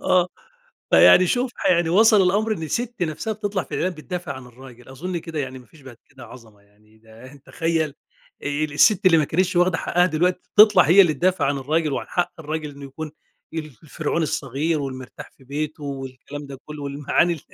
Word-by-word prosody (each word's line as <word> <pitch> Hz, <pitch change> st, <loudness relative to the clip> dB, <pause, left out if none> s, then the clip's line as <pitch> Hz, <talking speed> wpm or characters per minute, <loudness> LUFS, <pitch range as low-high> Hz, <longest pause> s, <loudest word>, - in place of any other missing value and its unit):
آه، 180 Hz, -1 st, +2 dB, 0.6 s
فيعني 185 Hz, 0 st, +7 dB
شوف 245 Hz, +5 st, 0 dB
ح -, -, +1 dB
يعني 170 Hz, -2 st, +2 dB
وصَل 215 Hz, +2 st, +5 dB
الأمر 210 Hz, +4 st, +1 dB
إن 160 Hz, -6 st, -4 dB
سِت 240 Hz, -4 st, -3 dB
نَفْسها 170 Hz, +7 st, -2 dB
بتطلَع 205 Hz, -3 st, -3 dB
في -, -, -8 dB
الإعلان 185 Hz, 0 st, -1 dB
بتدافع 175 Hz, 0 st, -6 dB
عن 130 Hz, -1 st, -10 dB
الراجل، 125 Hz, 0 st, -15 dB
أظن 170 Hz, +7 st, -5 dB
كده 160 Hz, -1 st, -7 dB
يعني 130 Hz, -1 st, -5 dB
ما 125 Hz, -, -17 dB
فيش 160 Hz, -, -20 dB
بعد 130 Hz, -3 st, -12 dB
كده 130 Hz, -3 st, -13 dB
عظمة 110 Hz, -5 st, -15 dB
يعني 105 Hz, +2 st, -27 dB
ده 115 Hz, +5 st, -15 dB
تخيل 160 Hz, -3 st, -1 dB, 0.5 s
ال 145 Hz, +1 st, -2 dB
السِت 200 Hz, +3 st, +4 dB
اللي 165 Hz, -3 st, +6 dB
ما 150 Hz, -, +2 dB
كانتش 180 Hz, +4 st, 0 dB
واخدة 175 Hz, -1 st, +3 dB
حقها 175 Hz, +1 st, +2 dB
دلوقتي 180 Hz, +3 st, -1 dB
تطلَع 210 Hz, 0 st, +8 dB
هي 180 Hz, +5 st, +6 dB
اللي 170 Hz, -5 st, +4 dB
تدافِع 180 Hz, +2 st, +1 dB
عن 140 Hz, 0 st, 0 dB
الراجل، 155 Hz, +2 st, -1 dB
وعن -, -, -3 dB
حق 175 Hz, -, -1 dB
الراجل 155 Hz, 0 st, -4 dB
إنه 140 Hz, 0 st, -11 dB
يكُون 150 Hz, +3 st, -8 dB, 0.4 s
ال 160 Hz, -1 st, -3 dB, 0.2 s
الفرعون 155 Hz, +2 st, -2 dB
الصغير 150 Hz, +2 st, -1 dB
والمرتاح 130 Hz, -2 st, -8 dB
في 130 Hz, -, -19 dB
بيته، 150 Hz, +2 st, -5 dB
والكلام 140 Hz, +1 st, -7 dB
ده 135 Hz, -1 st, -9 dB
كُلّه، 150 Hz, -1 st, -8 dB
والمعاني 145 Hz, +3 st, 0 dB
155 Hz, 190 wpm, -22 LUFS, 135-180 Hz, 0.6 s, تطلَع